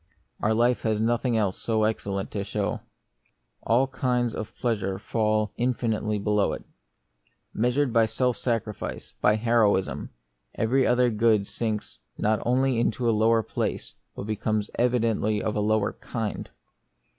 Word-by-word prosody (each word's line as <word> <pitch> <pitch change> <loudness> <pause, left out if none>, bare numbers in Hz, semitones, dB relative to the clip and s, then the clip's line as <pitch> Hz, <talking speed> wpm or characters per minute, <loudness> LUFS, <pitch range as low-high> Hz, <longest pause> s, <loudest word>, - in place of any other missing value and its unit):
Our 110 +1 +2
life 120 +2 +2
has 110 -2 0
nothing 115 +1 +1
else 100 -4 -1
so 110 -2 +1
excellent 100 -3 -2
to 100 - -2
show. 100 - -2 0.8
All 120 +4 +3
kinds 125 -3 0
of 110 - -6
pleasure 100 -6 -1
fall 110 0 0
infinitely 115 -3 0
below 105 0 +1
it. - - -6 0.9
Measured 125 +3 +1
by 115 -1 +4
self 125 +2 0
sacrifice, 115 -4 -3
by 105 - +4
heroism, 110 -4 +1 0.5
every 125 +4 +2
other 125 0 +3
good 110 -2 +3
sinks 105 - -4 0.2
not 110 +1 +1
only 130 0 +2
into 120 +1 0
a - - +5
lower 110 +1 +3
place, - - -3 0.2
but - - -5
becomes 110 0 -2
evidently 115 -3 +1
of 105 - -2
a - - 0
lower 105 0 +1
kind. 110 -3 -5
110 Hz, 140 wpm, -26 LUFS, 105-120 Hz, 0.9 s, a